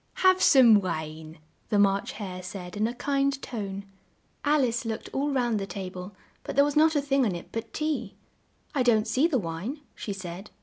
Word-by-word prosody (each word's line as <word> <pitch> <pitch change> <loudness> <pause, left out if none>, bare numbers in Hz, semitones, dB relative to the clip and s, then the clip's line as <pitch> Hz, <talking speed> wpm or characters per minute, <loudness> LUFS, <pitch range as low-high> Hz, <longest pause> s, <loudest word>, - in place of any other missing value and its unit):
"Have 370 0 +6
some 235 -7 +7
wine," 160 -2 -5 0.3
the 210 - +2
March 200 -1 +2
Hare 185 -4 -6
said 180 0 -7
in 215 +2 +1
a 235 - -4
kind 275 +1 0
tone. 200 -6 -5 0.6
Al 295 -1 +3
ice 240 -1 0
looked 225 -1 -4
all 280 +2 0
round 240 -5 +1
the 195 - -4
ta 195 -2 -5
ble, 185 +1 -9 0.3
but - - -5
there 280 +1 +6
was 290 0 -2
not 315 +1 +5
a 290 - +3
thing 275 -1 +2
on 205 -7 0
it 170 - -8
but 225 0 -5
tea. 305 -1 -2 0.6
"I 280 - +1
don't 230 -3 +3
see 260 +8 +3
the 310 -6 +1
wine," 200 - -4
she 210 - -6
said. 190 0 -7
220 Hz, 205 wpm, -27 LUFS, 190-275 Hz, 0.6 s, some